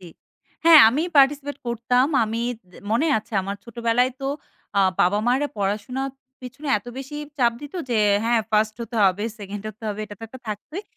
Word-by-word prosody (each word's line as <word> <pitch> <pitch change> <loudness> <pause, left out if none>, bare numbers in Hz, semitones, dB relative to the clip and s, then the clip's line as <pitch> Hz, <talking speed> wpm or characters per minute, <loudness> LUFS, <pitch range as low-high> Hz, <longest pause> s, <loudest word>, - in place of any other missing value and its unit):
জি। - - -14 0.6
হ্যাঁ, 330 -2 +10
আমি 270 +7 0
participate 280 0 +3
করতাম। 240 +2 +2 0.2
আমি 220 +1 -3 0.3
দে - - -17
মনে 240 +9 +2
আছে 215 - -15
আমার 200 +1 -4
ছোটবেলায় 235 +2 +1
তো - - -5 0.5
আ - - +6 0.2
বাবা-মারা 240 +10 +2
পড়াশোনার 210 +7 -2 0.3
পিছনে 265 +4 -8
এত 205 - -23
বেশি 270 +2 -8 0.2
চাপ 240 -2 +3
দিত 290 +2 -10 0.2
যে 235 - +1 0.3
হ্যাঁ, 235 0 +3
1st 215 0 +2
হতে 230 0 -6
হবে, 190 +1 +2 0.2
2nd 200 0 -7
হতে 215 +2 -12
হবে। 210 0 -4
এটা 210 - -10
তো - - -15
একটা 260 +2 -12
থাকতই। 290 - -6
235 Hz, 175 wpm, -23 LUFS, 210-270 Hz, 0.6 s, হ্যাঁ